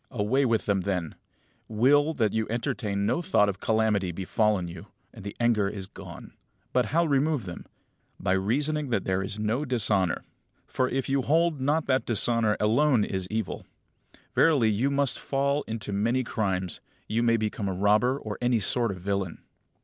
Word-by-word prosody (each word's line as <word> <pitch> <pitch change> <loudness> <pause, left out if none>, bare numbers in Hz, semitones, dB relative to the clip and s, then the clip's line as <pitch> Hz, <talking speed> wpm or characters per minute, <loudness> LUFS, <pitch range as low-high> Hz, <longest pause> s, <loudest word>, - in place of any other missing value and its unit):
Away 125 +5 +1
with 115 -3 +1
them 100 -2 +1
then; 90 -4 -2 0.5
will 145 +8 +3
that 110 -4 +1
you 110 -1 0
entertain 105 -3 -2
no 140 +11 +1
thought 165 - +3
of 95 - -4
calamity 110 -4 +1
befallen 95 +1 0
you, 85 - -9 0.3
and - - -11
the 100 - -6
anger 115 -4 +2
is 100 -2 -6
gone. - - -11 0.4
But 125 -3 +2
how 170 +8 +2
remove 145 -4 +1
them? 90 -2 -8 0.5
By 95 - -1
reasoning 140 +10 0
that 110 -5 0
there 95 0 0
is 100 +2 -5
no 110 +6 -1
dishonour; 105 - +1 0.4
for, 130 0 -1
if 135 0 -2
you 135 0 +1
hold 160 +1 +1
not 150 +4 +1
that 130 -1 0
dishonour 115 -1 +2
alone 120 +2 +3
is 95 -2 -3
evil, 110 -2 -4 0.7
verily 135 -9 +4
you 115 +7 +1
must 140 -1 +1
fall 140 +1 0
into 110 -2 -4
many 115 +6 +1
crimes, 95 -6 -2 0.3
you 115 +2 0
may 115 -1 +3
become 105 -1 -2
a - - -2
robber, 105 +7 +2
or 110 -6 -6
any 120 -1 +2
sort 115 +3 0
of 95 - -4
villain. 100 -2 -3
110 Hz, 170 wpm, -27 LUFS, 100-135 Hz, 0.7 s, verily